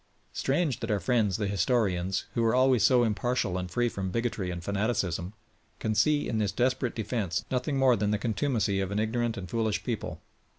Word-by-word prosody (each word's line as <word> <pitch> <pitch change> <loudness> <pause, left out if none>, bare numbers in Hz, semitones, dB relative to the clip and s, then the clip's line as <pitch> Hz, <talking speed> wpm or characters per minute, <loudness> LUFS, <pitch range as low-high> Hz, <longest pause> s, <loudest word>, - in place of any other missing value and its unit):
Strange 140 -1 0
that 115 -1 -4
our 105 -2 +1
friends 105 -1 +1
the 105 - -1
historians, 95 -2 0
who 115 - +1
are 115 +1 +3
always 130 -2 +4
so 125 -2 +5
impartial 110 -3 0
and 90 -1 -3
free 120 +7 +1
from 95 -4 -3
bigotry 110 -3 -2
and 85 -1 -5
fanaticism, 100 -3 -1 0.4
can 110 - -1
see 145 +8 +2
in 110 - -1
this 105 -2 +1
desperate 125 0 0
defence 105 -5 -2
nothing 130 +3 0
more 130 -2 +5
than 105 -1 0
the 105 - +1
contumacy 110 -2 0
of 95 -1 -1
an 100 - -2
ignorant 115 +2 0
and 95 -2 -6
foolish 110 +2 -1
people. - - -4
110 Hz, 195 wpm, -28 LUFS, 100-125 Hz, 0.4 s, so